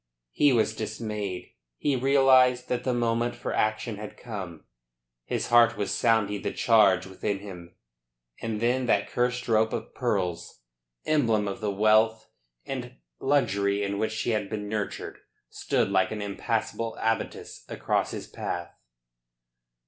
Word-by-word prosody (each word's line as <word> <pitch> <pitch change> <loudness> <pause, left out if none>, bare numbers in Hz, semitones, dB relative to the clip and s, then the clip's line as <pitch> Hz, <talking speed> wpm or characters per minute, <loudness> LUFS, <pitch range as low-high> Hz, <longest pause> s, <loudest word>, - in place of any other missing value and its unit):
He 145 - +4
was 110 -3 +2
dismayed. 105 -4 -4 0.3
He 145 - +1
realised 130 -1 +4
that 125 - -1
the 130 - 0
moment 120 0 0
for - - -4
action 110 0 0
had 105 0 -8
come. 95 -9 -7 0.6
His - - -2
heart 120 -1 +5
was 105 - -2
sounding 105 -4 +2
the - - -2
charge 100 -6 +4
within 100 +2 -3
him. 90 -3 -10 0.7
And 110 -2 -3
then 125 +2 +1
that 100 -3 +2
cursed 125 0 0
rope 110 -1 +2
of - - -5
pearls, 95 - -2 0.4
emblem 115 -9 +2
of 100 +3 -5
the 105 - -1
wealth 110 +2 +3 0.3
and 125 -2 -5 0.2
luxury 100 -8 +1
in 100 0 -2
which 110 0 -1
she 115 +2 -1
had 105 -3 -1
been 105 -2 -4
nurtured, 105 -1 -4 0.3
stood - - 0
like 95 -1 +3
an 110 - -4
impassable 115 +2 -2
abattis 115 0 -2
across - - 0
his - - -6
path. 85 -1 -5
110 Hz, 140 wpm, -27 LUFS, 100-120 Hz, 0.7 s, heart